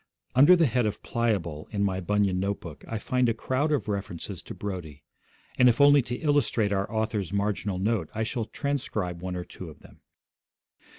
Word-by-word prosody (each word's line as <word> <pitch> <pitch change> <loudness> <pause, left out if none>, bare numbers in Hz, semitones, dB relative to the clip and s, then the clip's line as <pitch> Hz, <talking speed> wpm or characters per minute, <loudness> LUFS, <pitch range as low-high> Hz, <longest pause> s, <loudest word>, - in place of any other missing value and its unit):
Under 145 +8 +8
the 170 -2 +4
head 125 -3 +1
of 105 - -4
'Pliable' 95 -10 -1
in 100 -2 -1
my 95 -2 0
Bunyan 100 0 +1
note 100 +1 -1
book 85 -4 -10
I 115 - -3
find 125 +3 +1
a 115 - 0
crowd 130 +6 0
of 145 -6 0
references 100 -5 -4
to - - -9
Brodie; 90 -8 -6 0.6
and 125 0 +7
if 120 - +1
only 145 0 +7
to 120 0 -4
illustrate 125 -8 +1
our 100 0 -1
author's 110 -4 -1
marginal 100 -1 -1
note, 100 -3 0
I 110 - 0
shall 115 0 -2
transcribe 110 - -3
one 90 0 -4
or 90 - -3
two 90 -1 -9
of 75 - -14
them. - - -17
105 Hz, 190 wpm, -27 LUFS, 95-125 Hz, 0.6 s, Under